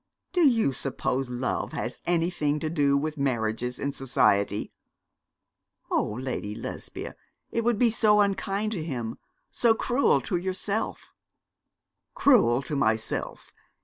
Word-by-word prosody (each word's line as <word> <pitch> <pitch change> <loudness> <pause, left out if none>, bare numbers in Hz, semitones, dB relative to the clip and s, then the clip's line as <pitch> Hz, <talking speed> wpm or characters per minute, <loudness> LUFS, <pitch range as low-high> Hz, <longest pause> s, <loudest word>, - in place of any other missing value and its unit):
'Do 360 - +2
you 225 - +2
suppose 130 -1 -2
love 125 +1 -2
has - - -4
anything 165 -3 +1
to 155 +1 -3
do 140 -4 +3
with 150 +1 -3
marriages 125 -2 -1
in 140 0 -2
society?' 105 -6 +1 1.2
'Oh, 105 - 0
Lady 125 -5 -4
Lesbia, 115 - -7 0.4
it 230 - 0
would 235 -1 +2
be 235 0 +4
so 215 -1 +4
unkind 200 +1 0
to 180 -8 -3
him, 120 -8 -4 0.3
so 230 -2 +3
cruel 250 +4 +2
to 185 - -1
yourself.' 190 +4 -3 1.0
'Cruel 140 - +4
to 150 - -4
myself. 110 -4 -1
150 Hz, 125 wpm, -27 LUFS, 125-205 Hz, 1.2 s, be